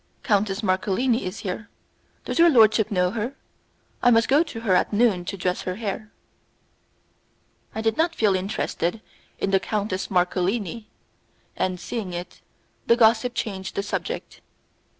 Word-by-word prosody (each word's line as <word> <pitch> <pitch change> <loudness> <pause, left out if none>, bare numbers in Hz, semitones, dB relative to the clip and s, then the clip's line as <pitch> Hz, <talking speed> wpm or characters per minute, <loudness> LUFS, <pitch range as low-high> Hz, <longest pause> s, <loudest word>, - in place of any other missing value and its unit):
Countess 205 -1 +1
Marcolini 205 +6 +1
is 185 +3 -5
here; 210 +3 -5 0.6
does - - -2
your 340 0 +8
lordship 220 -5 +5
know 180 -3 +1
her? 230 +5 -3 0.7
I 245 - +5
must 230 -1 +4
go 285 +3 +5
to 290 -9 -4
her 210 -5 +1
at 180 - +2
noon 205 -5 +2
to 195 - -4
dress 180 0 -1
her 185 - -3
hair." 215 0 -5 1.6
I 220 - -2
did 225 0 0
not 330 +1 +1
feel 210 -3 +3
interested 185 +1 -2 0.4
in 195 - -1
the 195 - +4
Countess 200 -1 -2
Marcolini, 190 +4 0 0.7
and, 185 -1 -1
seeing 195 -1 -5
it, 175 +1 -7 0.5
the 235 - +5
gossip 235 +1 +4
changed 190 -4 -4
the 200 - -1
subject. 205 - -5
210 Hz, 150 wpm, -24 LUFS, 185-230 Hz, 1.6 s, your